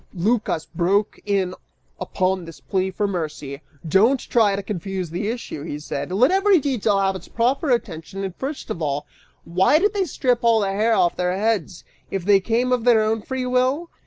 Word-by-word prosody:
Lycas 205 -3 0
broke 195 +4 0
in 195 -3 +1 0.5
upon 185 -1 -1
this 165 -1 -11
plea 190 -1 -1
for 200 +2 -2
mercy, 155 -7 -4 0.3
"Don't 220 - +4
try 215 -5 +2
to 200 - -4
confuse 190 -3 -4
the 180 +5 -3
issue," 230 -9 -5
he 145 -1 -5
said, 150 +4 -5
"let 245 - +4
every 390 0 +4
detail 245 -8 +1
have 195 -1 +1
its 190 - -9
proper 260 +6 0
attention 195 -5 -2
and 190 -2 -4
first 275 +2 -5
of 170 - -4
all, 145 -1 -1 0.4
why 185 - +3
did 400 +5 +2
they 395 -2 0
strip 250 -6 0
all 230 -2 +4
the 195 -1 0
hair 220 +3 +2
off 175 - +2
their 180 +1 0
heads, 205 -5 -1 0.3
if 190 -3 -3
they 200 -1 +5
came 235 +5 0
of 250 -2 +1
their 230 -3 +5
own 220 0 0
free 260 +3 -3
will? 255 +6 0
205 Hz, 190 wpm, -22 LUFS, 185-245 Hz, 0.5 s, they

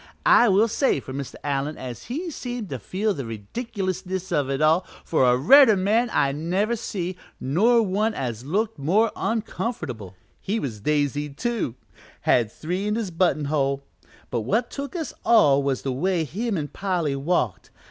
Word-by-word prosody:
I 240 - +6
will 200 +4 +4
say 230 - +1
for 130 - -9
Mr. 135 -1 -5
Allen 145 +1 -2
as 125 -2 -7
he 330 +8 -4
seemed 245 - -5
to 135 - -4
feel 200 - -1
the 140 - -5
ridiculousness 190 - -4
of 140 -2 +1
it 135 0 -1
all, 155 +4 +4 0.2
for 145 -5 +2
a 125 - +4
redder 225 - +7
man 220 +6 +2
I 140 - +2
never 180 +10 0
see, 185 -5 -4 0.2
nor 225 - +3
one 210 +3 0
as 120 -2 -4
looked 205 +6 -1
more 200 +11 +2
uncomfortable. 155 - -3 0.2
He 215 +4 -2
was 115 - -4
daisied, 145 +1 -1
too 235 - -2 0.5
had 115 -3 +2
three 180 - -3
in 210 - 0
his 220 -5 -2
button 165 -3 +1
hole; 140 -1 0 0.5
but 120 -3 0
what 225 - 0
took 280 +4 -6
us 320 -6 -4
all 145 -12 +5
was 135 -2 -1
the 135 - -1
way 175 +5 0
him 205 - -2
an' 145 -2 -3
Polly 175 -7 -1
walked. 140 - -1
180 Hz, 170 wpm, -24 LUFS, 140-220 Hz, 0.5 s, redder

